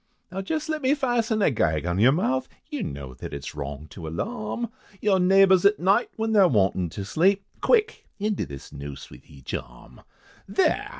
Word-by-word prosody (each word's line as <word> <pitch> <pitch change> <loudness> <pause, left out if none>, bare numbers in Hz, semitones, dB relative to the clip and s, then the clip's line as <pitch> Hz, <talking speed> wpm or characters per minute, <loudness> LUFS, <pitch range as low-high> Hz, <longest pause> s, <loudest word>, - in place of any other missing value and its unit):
"Now 190 +1 -3
jest 310 - -3
let 310 -1 -2
me 265 +2 +3
fasten 235 -6 +1
a - - +4
gag 80 - 0
on 90 +2 -1
yer 120 +5 +6
mouth, 130 -5 0 0.2
You - - -3
know 70 -2 -6
that 65 - -7
it's - - -6
wrong, 70 0 -6
to 85 -4 -8
alarm 110 - -3 0.3
Your 200 -3 +2
neighbours 190 0 +5
at 200 +1 +5
night, 195 +7 +3
when 225 0 -1
they're 200 -4 +6
wantin' 95 - +1
to 100 +4 -6
sleep, 190 - +2 0.2
Quick! 460 -2 +2
into 210 -1 -1
this 70 -1 -10
noose 70 0 -8
with - - -15
each 70 -2 -10
arm, - - -8 0.5
There! - - +1
175 Hz, 185 wpm, -25 LUFS, -, 0.5 s, yer